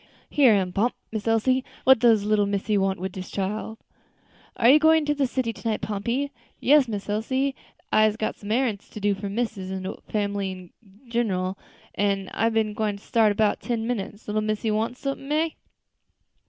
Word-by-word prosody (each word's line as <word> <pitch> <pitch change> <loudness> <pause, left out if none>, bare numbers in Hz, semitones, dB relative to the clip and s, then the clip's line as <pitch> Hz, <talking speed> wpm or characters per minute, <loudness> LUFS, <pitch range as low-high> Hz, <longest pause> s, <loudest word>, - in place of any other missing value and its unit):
"Here 265 -6 +6
am 185 -3 0
Pomp, 230 +6 +1 0.2
Miss 220 0 -4
Elsie; 255 +4 +2 0.2
what 265 -2 +6
does 225 -3 +4
little 210 -1 +2
missy 200 +1 0
want 195 -1 +1
wid 190 +1 -3
dis 185 0 -7
chile?" 210 +3 -3 0.8
"Are 235 - +4
you 280 +5 +8
going 320 0 +4
to 295 - +2
the 280 -2 +1
city 245 -2 -2
to 230 - -4
night, 215 - -1
Pompey?" 235 +7 -2 0.3
"Yes, 285 -1 +5
Miss 205 -3 -4
Elsie, 260 +6 0 0.4
I'se 215 0 +4
got 220 - -2
some 205 - -10
arrants 225 -3 0
to - - -6
do 205 0 +2
for 200 +1 -5
missus 205 -3 -3
an' 190 0 -4
de 190 - -3 0.2
family 200 -2 -1
in 185 -2 -10 0.4
ginral, 195 -6 -1 0.4
an' 195 -2 0
I 225 +2 +2
ben 220 -2 0
gwine 210 -1 -1
start 215 +1 +2
in - - -15
'bout 215 -1 +2
ten 230 -2 -2
minutes. 215 -3 -4
Little 215 +1 0
missy 215 +1 -1
wants 225 +4 -2
sumpin', 275 0 -4
eh?" 315 +2 +2
215 Hz, 190 wpm, -25 LUFS, 200-240 Hz, 0.8 s, you